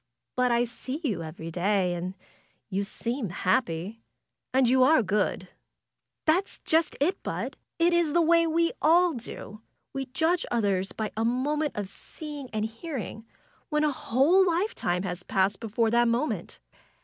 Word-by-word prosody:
But 250 -1 +2
I 235 0 +3
see 255 +4 -5
you 210 - -1
every 160 +1 -7
day, 185 +1 +1
and 180 +2 -4 0.6
you 195 +1 0
seem 235 +2 -3
happy. 200 +1 -1 0.5
And 260 -1 +4
you 260 +2 +4
are 260 0 +6
good." 195 -2 0 0.8
That's 350 +5 +2
just 320 +1 +2
it. 350 +7 +1
Bud! - - -4 0.2
It 340 +1 +3
is 340 -3 +2
the 345 - +4
way 335 +1 +4
we 335 +1 +2
all 345 +2 +5
do. 215 -3 -7 0.3
We 270 -1 -3
judge 320 +7 +1
others 200 -5 0
by 220 -1 -3
a 220 - 0
moment 285 +6 0
of 205 -2 -3
seeing 290 +5 -9
and 215 -1 -1
hearing, 225 -2 -6 0.4
when 300 0 +1
a 300 - +3
whole 280 +9 +3
life 370 +5 +1
time 175 +1 -1
has 180 -2 -4
passed 195 +2 +1
before 225 0 0
that 240 +1 +4
moment. 240 +6 -1
245 Hz, 160 wpm, -27 LUFS, 205-310 Hz, 0.8 s, are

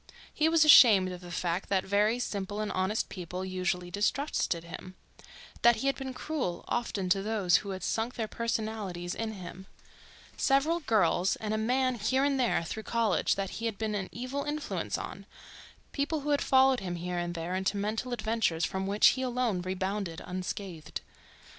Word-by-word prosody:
He 315 +1 +2
was 325 -1 +5
ashamed 210 -10 +8
of 180 0 -8
the 175 - -10
fact 175 +1 -2
that 190 -1 +2
very 210 +4 +2
simple 205 -4 -3
and 215 -1 -2
honest 190 +4 0
people 180 0 -6
usually 180 -1 -2
distrusted 205 - 0
him; 185 +2 -9 0.7
that 235 0 +6
he 225 - -4
had 275 - +2
been 265 -1 -6
cruel, 255 - -3
often, 220 -5 -2
to 195 +1 +3
those 200 -5 +2
who 200 - -6
had 190 -1 -5
sunk 230 +2 -1
their 225 -2 -2
personalities 215 -6 -3
in 225 -1 -3
him—several 270 - -3
girls, 215 - +2
and 215 -1 -3
a - - 0
man 255 +2 +1
here 260 +6 +1
and 280 -1 +1
there 240 -8 +2
through 220 +6 -5
college, 230 0 +1
that 195 -1 -3
he 230 - 0
had 220 -3 -4
been 220 0 -2
an 195 -2 -3
evil 255 +4 -4
influence 295 0 -3
on; - - -7 0.6
people 295 +2 -1
who 295 +1 -2
had 285 - +2
followed 265 -1 +4
him 180 -3 -4
here 175 +1 -3
and 175 0 -3
there 170 +2 -3
into 190 +2 0
mental 215 +5 -2
adventures 220 -8 0
from 190 +3 -3
which 205 +1 +6
he 260 - -1
alone 245 -7 0
rebounded 190 -1 -3
unscathed. 180 -2 -5
210 Hz, 180 wpm, -30 LUFS, 185-245 Hz, 0.7 s, ashamed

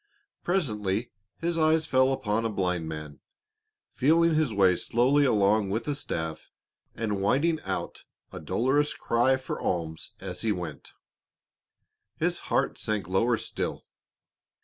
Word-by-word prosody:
Presently 110 - -1 0.3
his 170 0 -1
eyes 160 0 +3
fell 130 0 +3
upon 115 -4 0
a 115 - 0
blind 90 -5 -1
man, 75 -2 -7 0.7
feeling 165 +5 +4
his 155 -5 +2
way 95 -3 +4
slowly 130 +9 +2
along 105 -3 +3
with 110 +8 -2
a 145 - +1
staff 80 - -5 0.5
and 105 -3 -2
whining 155 +10 +2
out 95 -1 -4 0.3
a - - -7
dolorous 135 - +1
cry 120 +3 +2
for 130 - -5
alms 80 -3 -3
as - - -5
he 110 - +1
went. 85 -7 -6 1.2
His - - 0
heart - - +1
sank 105 -5 -2
lower 115 +6 +2
still. - - -4
115 Hz, 130 wpm, -27 LUFS, 95-140 Hz, 1.2 s, feeling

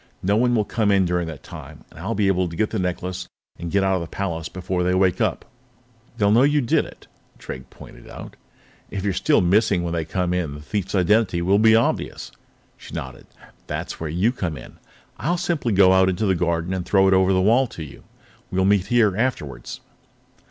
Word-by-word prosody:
No 100 +3 +2
one 120 +2 +2
will 105 -2 +1
come 105 +1 0
in 100 -2 +3
during 90 -1 -1
that 80 -4 -8
time, - - -11
and - - -14
I'll 105 +7 -3
be 105 - +1
able 95 -2 +1
to 85 - -8
get 105 +5 0
the 110 - -2
necklace 90 0 -3 0.3
and 85 0 -5
get 100 +2 +1
out 95 0 +2
of 95 - 0
the 85 - -5
palace 85 -3 -4
before 95 0 -3
they 90 +1 +1
wake 95 -2 +2
up." - - -1 0.7
"They'll 100 -2 +3
know 115 +3 +5
you 145 +2 +3
did 120 -4 +1
it," - - -14 0.3
Drake 65 0 -9
pointed - - -14
out. - - -10 0.5
"If 95 - -5
you're 100 -2 0
still - - +2
missing 95 0 +2
when 85 -1 -3
they 85 -1 -1
come 90 +2 -2
to, 90 -2 0
the 70 0 -8
thief's 95 +6 -3
identity 95 -1 +2
will 100 +3 +3
be 110 0 +6
obvious." 115 - -1 0.5
She - - -11
nodded. 65 -1 -7 0.4
"That's - - -5
where 80 - -4
you 90 +9 +1
come 90 - -4
in. - - -13 0.4
I'll 175 +4 0
simply 170 -8 -1
go 95 -2 +5
out 95 0 +4
into 95 +4 -1
the 95 - +3
garden 85 0 -1
and 95 -1 -2
throw 95 +1 +3
it 95 - +4
over 95 0 +4
the 95 - +3
wall 115 +7 +3
to 85 - -8
you. 70 - -12 0.5
We'll 95 0 +1
meet 100 -1 +2
here 115 -5 +3
afterwards." 110 - -3
95 Hz, 215 wpm, -22 LUFS, 85-105 Hz, 0.7 s, be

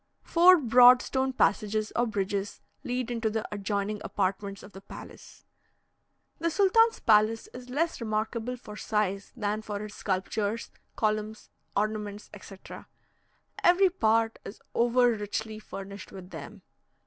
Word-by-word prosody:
Four 360 +2 +6
broad 245 -2 +7
stone 265 0 -1
passages 215 -3 0
or 240 0 +2
bridges 200 -1 -3 0.2
lead 250 -1 -3
into 230 -2 -1
the 220 0 -3
adjoining 205 0 -2
apartments 195 0 -2
of 200 - -13
the 195 - -10
palace. 195 - -12 0.9
The 335 - 0
sultan's 425 +6 +3
palace 220 +1 +3
is 250 0 -10
less 315 +2 -1
remarkable 225 +2 -2
for 210 -3 -11
size 205 -2 -2
than 210 -2 -2
for 210 -1 -5
its 210 - -10
sculptures, 205 +3 -2 0.2
columns, 215 0 -2 0.2
ornaments, 210 0 -3
etc. 195 -1 -11 0.8
Every 365 +1 +5
part 225 -10 +1
is 200 - -9
over 240 +1 +3
richly 215 0 -4
furnished 200 -2 -9
with 190 -1 -11
them. - - -9
215 Hz, 130 wpm, -28 LUFS, 205-245 Hz, 0.9 s, broad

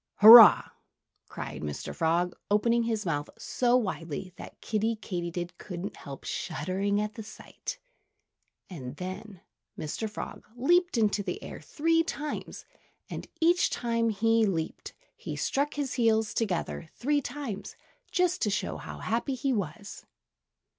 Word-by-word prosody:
"Hurrah!" 225 +1 +10 0.6
cried - - -6
Mr. 75 -1 -5
Frog, 170 +2 +1 0.2
opening 230 +3 +3
his 220 -3 -1
mouth 145 -4 -2
so 245 0 +2
widely 185 - -4
that - - -11
Kiddie 220 +1 -1
Katydid 175 -4 -5
couldn't 190 +1 -6
help 140 -2 -10
shuddering 195 +7 -2
at 210 0 -2
the 225 - -7
sight. 215 - -8 0.9
And 135 -7 -8
then 185 +2 -7 0.4
Mr. 185 +8 -4
Frog 210 - -8
leaped 345 +5 +2
into 210 -2 +2
the 370 - -5
air - - -8
three 330 +2 +1
times. 300 -2 -5 0.5
And - - -6
each 345 +2 +4
time 230 -1 0
that 215 -3 -2
he 225 +1 +3
leaped, 165 -5 -3 0.2
he - - -6
struck 285 +2 -1
his 285 -3 -2
heels 220 -3 +2
together 180 -6 -2
three 290 +3 +1
times, 250 -6 -6 0.4
just 360 0 +1
to 210 - +2
show 200 - -2
how - - -8
happy 235 +4 -1
he 270 +1 0
was. 200 0 -5
215 Hz, 140 wpm, -28 LUFS, 180-245 Hz, 0.9 s, Hurrah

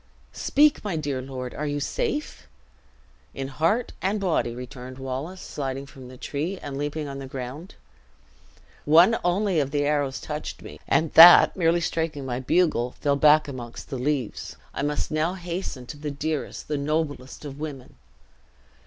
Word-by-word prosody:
"Speak, 295 +1 +3
my 200 -5 -2
dear 145 -4 -2
lord; 130 -1 -6
are 150 - -3
you 145 0 -1
safe?" 305 - -3 0.9
"In 135 0 -4
heart 165 - 0
and 200 +3 0
body!" 165 -11 0
returned 125 +1 -8
Wallace, 135 +8 -5
sliding 135 -1 -4
from 135 -2 -12
the 130 0 -12
tree, 155 +9 -3
and 140 -1 -5
leaping 145 +2 -3
on 140 0 -6
the 135 - -7
ground. 135 +7 -7 1.1
"One 170 +9 +6
only 180 0 +1
of 140 -2 0
the 145 0 0
arrows 145 -2 0
touched 150 0 -6
me; - - -10
and 160 -1 +2
that 170 +2 +10
merely 170 -1 +2
striking 160 -4 -2
my 125 -1 -2
bugle, 130 -4 +1
fell 140 -1 +2
back 150 +1 +5
amongst 125 -1 -8
the 130 - -3
leaves. 135 -3 -2 0.2
I - - -3
must 145 +1 -1
now 155 +4 0
hasten 175 -7 -5
to 145 - -8
the 150 0 -4
dearest, 150 +1 -4
the 150 -1 -1
noblest 145 -2 -3
of 140 0 -8
women!" 145 -4 -7
145 Hz, 160 wpm, -25 LUFS, 135-165 Hz, 1.1 s, that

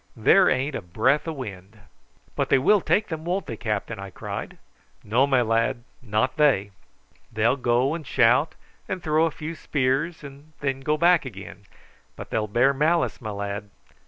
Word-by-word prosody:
There 180 - +5
ain't 135 +3 0
a - - -4
breath 130 - +1
o' - - -1
wind." 105 - -9 0.6
"But - - -1
they - - +5
will 200 +10 +4
take 210 +4 +1
them, 160 -2 -5
won't 180 +3 -2
they, 115 - -5
captain?" 110 0 -3
I 100 0 -7
cried. - - -7 0.5
"No, 125 +6 +2
my 130 -3 +3
lad, 115 +2 0 0.2
not 110 +3 -1
they. 130 -10 +3 0.6
They'll 110 +4 +2
go 125 +1 +1
and 160 -4 -6
shout 125 +6 +3 0.3
and 185 -2 -4
throw 155 0 +2
a - - -1
few 160 +1 -7
spears, 145 +2 -1
and 140 +2 -12
then 135 -2 -2
go 150 +3 0
back 175 +1 +4
again; 100 -4 -10 0.5
but - - -10
they'll 110 -1 -1
bear 120 +6 +3
malice, 155 +2 +1
my 110 - -5
lad. 100 0 -5
130 Hz, 175 wpm, -24 LUFS, 110-155 Hz, 0.6 s, There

